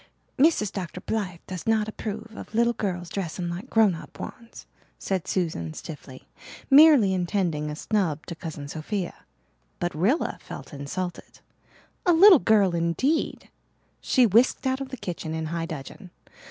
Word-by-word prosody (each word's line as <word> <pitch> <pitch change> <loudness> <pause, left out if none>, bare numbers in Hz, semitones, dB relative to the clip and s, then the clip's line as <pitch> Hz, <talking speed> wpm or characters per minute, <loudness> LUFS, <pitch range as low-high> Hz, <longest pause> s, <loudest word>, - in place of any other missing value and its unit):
"Mrs. 270 - +3
Dr. 180 -2 -5
Blythe 185 -4 -3
does 185 0 -7
not 220 -1 +2
approve 220 +1 -6
of 215 - -9
little 235 +1 +3
girls 180 -5 -3
dressing 175 -1 -4
like 185 +9 -7
grown 220 -4 +4
up 165 - -10
ones," 230 -2 -9 0.3
said 190 -3 -3
Susan 155 - -2
stiffly, 140 -4 -10 0.4
intending 195 - +5
merely 150 - -3
a - - -5
snub 165 -4 -1
to 170 - -6
Cousin 160 -3 -7
Sophia. 175 +5 -4 0.7
But 175 -2 -2
Rilla 205 - 0
felt - - -9
insulted. 175 +6 -6 0.7
A 350 - +6
little 365 0 +8
girl 205 -6 +3
indeed! 170 - -1 0.5
She 255 - +4
whisked 230 +6 +3
out 260 +1 0
of 270 - -5
the 260 - -7
kitchen 175 -6 -5
in 160 0 -3
high 165 +1 -3
dudgeon. 160 +5 -8
190 Hz, 150 wpm, -25 LUFS, 165-225 Hz, 0.7 s, little